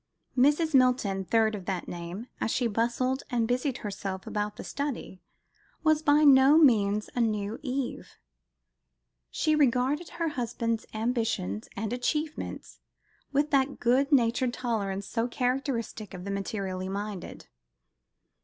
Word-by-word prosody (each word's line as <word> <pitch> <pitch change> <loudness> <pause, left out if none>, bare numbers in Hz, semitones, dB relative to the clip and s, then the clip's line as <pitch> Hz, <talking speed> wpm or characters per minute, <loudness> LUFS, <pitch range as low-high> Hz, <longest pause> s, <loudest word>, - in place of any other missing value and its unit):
Mrs. 295 +5 +3
Milton, 250 -7 +3
third 220 +2 +2
of 195 -4 -6
that 185 -2 -3
name, 175 +5 -6
as - - -1
she 245 - 0
bustled 240 +4 0
and 235 -2 +1
busied 250 +2 0
herself 195 -2 -4
about 210 0 -3
the - - -8
study, 280 -10 -4 0.6
was 310 -1 +3
by 295 0 +4
no 275 +1 +7
means 210 -8 +4
a 245 - 0
new 215 0 -1
Eve. 265 -2 -4 1.1
She 310 -1 +1
regarded 280 +3 +2
her 335 -1 0
husband's 230 -4 -2
ambitions 220 - -1
and 220 +2 -3
achievements 300 +5 -3 0.5
with 295 +2 +1
that 275 0 +2
good 260 +4 +2
natured 240 -1 +2
tolerance 200 -5 -2
so 230 +2 -1
characteristic 245 -5 -2
of 180 - -8
the 200 - -3
materially 195 -2 -3
minded. 200 -1 -5
240 Hz, 130 wpm, -28 LUFS, 205-270 Hz, 1.1 s, no